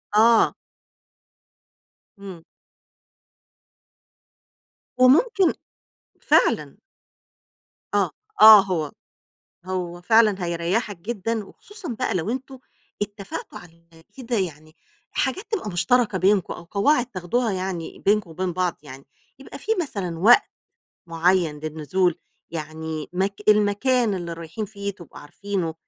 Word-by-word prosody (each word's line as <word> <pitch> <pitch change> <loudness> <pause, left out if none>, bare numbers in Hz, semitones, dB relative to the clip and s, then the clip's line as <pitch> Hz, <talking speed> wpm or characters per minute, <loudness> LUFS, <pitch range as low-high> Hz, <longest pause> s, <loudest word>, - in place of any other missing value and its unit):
آه. 225 +1 +5 1.7
إمم. 190 -4 -10 2.5
وممكن 335 - +4 0.7
فعلًا. - - +2 1.2
آه، - - +2 0.3
آه، 215 -1 +11
هو 170 -7 -3 0.7
هو 180 -2 -4
فعلًا 220 +1 +4
هيريّحك 175 +5 -2
جدًا، 220 +3 -3
وخصوصًا 415 - -11
بقى - - 0
لو 180 +3 -2
أنتم 260 +2 -5 0.4
اتفقتم 205 -1 -6
على 170 -1 -17 0.3
كده 245 -2 -3
يعني 155 -4 -5 0.4
حاجات 370 - -2
تبقى 390 - -2
مشتركة 215 +3 +1
بينكم 190 0 +2
أو - - -10
قواعد 235 - +1
تاخدوها 225 +2 -2
يعني 185 -3 -4
بينكم 205 -3 +2
وبين 180 +2 -3
بعض 180 -1 -1
يعني. 135 -2 -12 0.3
يبقى 270 - -11
في 440 - -3
مثلًا 185 - -5
وقت 225 +7 +6 0.6
معيّن 165 -2 +1
للنزول، 155 +3 -1 0.3
يعني 155 -1 -6
مك 195 +2 -2
المكان 210 +2 +3
اللي 175 -2 -5
رايحين 165 +5 -6
فيه 200 -1 -5
تبقوا 180 -6 -13
عارفينه، 180 +2 -4
190 Hz, 105 wpm, -23 LUFS, 170-225 Hz, 2.5 s, آه